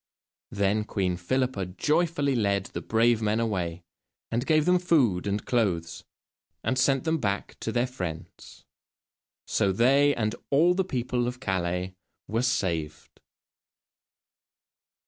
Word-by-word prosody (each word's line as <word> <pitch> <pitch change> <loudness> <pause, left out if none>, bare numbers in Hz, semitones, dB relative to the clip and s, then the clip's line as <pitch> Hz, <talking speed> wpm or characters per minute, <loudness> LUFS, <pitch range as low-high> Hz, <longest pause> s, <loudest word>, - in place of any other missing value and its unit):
Then 100 +1 0
Queen 95 -4 -1
Philippa 115 +2 -1
joyfully 145 - 0
led 100 -4 +1
the - - -6
brave 115 0 +2
men 110 +1 +1
away, 90 -7 -2 0.5
and 120 +3 -1
gave 155 -1 +3
them 180 0 +4
food 125 - +2
and 100 +1 -2
clothes, 90 -9 -1 0.6
and 130 - 0
sent 135 0 +2
them 160 0 0
back 100 -4 -2
to 110 - -3
their 120 +2 +1
friends. 90 -11 -8 0.8
So 100 - +1
they, 135 +8 +4
and 110 -2 -1 0.2
all 165 +6 +4
the 190 +1 +1
people 125 -6 -2
of 125 +1 -5
Calais, 90 -4 -2 0.3
were 115 +2 0
saved. 85 -11 -2
115 Hz, 125 wpm, -27 LUFS, 95-130 Hz, 0.8 s, them